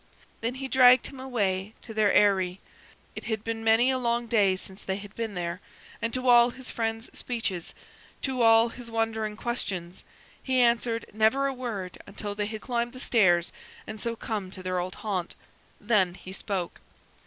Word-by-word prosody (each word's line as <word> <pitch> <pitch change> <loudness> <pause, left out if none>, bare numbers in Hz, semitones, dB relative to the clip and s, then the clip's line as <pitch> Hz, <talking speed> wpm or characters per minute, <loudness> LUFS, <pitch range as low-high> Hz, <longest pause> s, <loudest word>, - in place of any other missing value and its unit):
Then 230 +2 -2
he 265 0 -4
dragged 255 -1 +6
him 270 - -8
away 210 -6 -1
to 225 - -7
their 215 -2 +3
Eyry 190 -3 +3 0.6
it - - -7
had 220 -2 -2
been 225 0 -3
many 225 +3 +4
a 260 - 0
long 235 -1 0
day 210 -5 +3
since 190 +1 -11
they 190 - -2
had 205 +1 -9
been 225 -3 -4
there 175 +1 -3 0.4
and 230 - -1
to 255 0 -2
all 240 0 +7
his 260 +1 -8
friend's 225 0 -3
speeches, 210 -8 -3 0.5
to 260 -2 -1
all 225 0 +6
his 240 0 -9
wondering 220 -2 -1
questions, 190 -7 -4 0.4
he 260 -1 +1
answered 235 -1 +2
never 220 +6 +3
a 275 - 0
word 220 -8 -5
until 205 0 -5
they 205 0 -2
had 215 0 -6
climbed 240 +1 -2
the 255 - -9
stairs, 175 -9 +3 0.3
and 220 -1 -7
so 235 -1 -2
come 210 -4 -4
to 185 0 -10
their 185 0 -1
old 180 +1 -4
haunt. 190 -5 -3 0.4
Then 205 -5 +2
he 185 0 -10
spoke. 190 -3 -4
225 Hz, 180 wpm, -27 LUFS, 195-240 Hz, 0.6 s, all